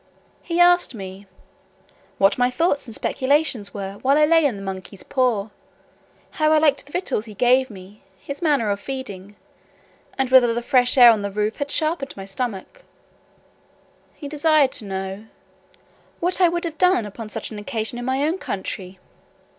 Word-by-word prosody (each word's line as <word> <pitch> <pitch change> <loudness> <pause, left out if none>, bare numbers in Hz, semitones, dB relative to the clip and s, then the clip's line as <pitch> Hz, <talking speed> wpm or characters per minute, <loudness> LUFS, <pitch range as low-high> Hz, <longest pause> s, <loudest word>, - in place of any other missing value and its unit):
He 340 0 -3
asked 350 -6 +4
me, 195 -1 -9 0.9
"what 195 +5 +3
my 245 0 +3
thoughts 285 0 0
and 225 - -8
speculations 260 - 0
were, 195 0 -7
while 275 +2 +3
I 305 - +5
lay 325 0 +4
in 265 -7 +1
the 195 - -8
monkey's 190 0 -7
paw; 235 -6 0 0.8
how 310 0 +1
I 315 - +5
liked 295 -2 +2
the 290 - -18
victuals 355 - -2
he 215 -2 -11
gave 255 +4 +3
me; 200 0 -13 0.2
his 280 - -8
manner 285 -10 +1
of 200 - -2
feeding; 205 -7 -7 0.8
and 265 -2 -1
whether 245 -3 +5
the 240 - -3
fresh 250 0 +3
air 240 -2 +9
on 220 -2 0
the 200 - -3
roof 210 +2 -2
had 285 -1 -3
sharpened 310 -4 -1
my 195 - -7
stomach." 230 - -5 1.3
He 290 - -8
desired 300 -2 +3
to 215 - -5
know, 190 +1 -5 0.9
"what 360 +2 0
I 360 - +7
would 345 0 -3
have 320 -2 -6
done 360 - +3
upon 215 +2 -8
such - - -5
an 215 - -7
occasion 225 +1 -4
in 245 - -5
my 260 +2 0
own 325 +5 -1
country." 190 -1 -5
250 Hz, 175 wpm, -22 LUFS, 205-295 Hz, 1.3 s, air